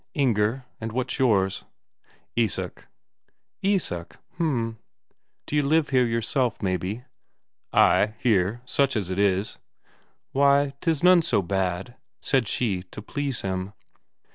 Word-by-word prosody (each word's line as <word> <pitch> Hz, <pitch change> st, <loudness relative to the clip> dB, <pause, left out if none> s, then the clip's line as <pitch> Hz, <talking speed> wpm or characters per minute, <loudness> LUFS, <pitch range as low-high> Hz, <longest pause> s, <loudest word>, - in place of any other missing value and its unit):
"Inger. 125 Hz, -2 st, +1 dB
And 115 Hz, 0 st, -5 dB
what's 130 Hz, +1 st, -2 dB
yours?" 100 Hz, -7 st, +2 dB, 0.7 s
"Isak." 115 Hz, -5 st, -1 dB, 0.7 s
"Isak? 190 Hz, -, -1 dB, 0.2 s
H'm. 115 Hz, -9 st, -1 dB, 0.7 s
D'you 150 Hz, 0 st, +1 dB
live 150 Hz, +2 st, +2 dB
here 130 Hz, -3 st, +3 dB
yourself, 115 Hz, +2 st, 0 dB
maybe?" 95 Hz, +4 st, -2 dB, 0.7 s
"Ay, 105 Hz, +1 st, +4 dB
here, 110 Hz, 0 st, +1 dB
such 140 Hz, +1 st, +1 dB
as 95 Hz, -4 st, -2 dB
it 95 Hz, -, -2 dB
is." 100 Hz, 0 st, +1 dB, 0.7 s
"Why, 140 Hz, 0 st, +3 dB
'tis 165 Hz, -3 st, 0 dB
none 180 Hz, -1 st, +7 dB
so 105 Hz, -10 st, +1 dB
bad," 95 Hz, +5 st, -2 dB, 0.2 s
said 130 Hz, -5 st, +1 dB
she 100 Hz, -7 st, 0 dB
to 105 Hz, -, -9 dB
please 140 Hz, +1 st, -3 dB
him. 95 Hz, +1 st, -3 dB
115 Hz, 115 wpm, -25 LUFS, 100-140 Hz, 0.7 s, none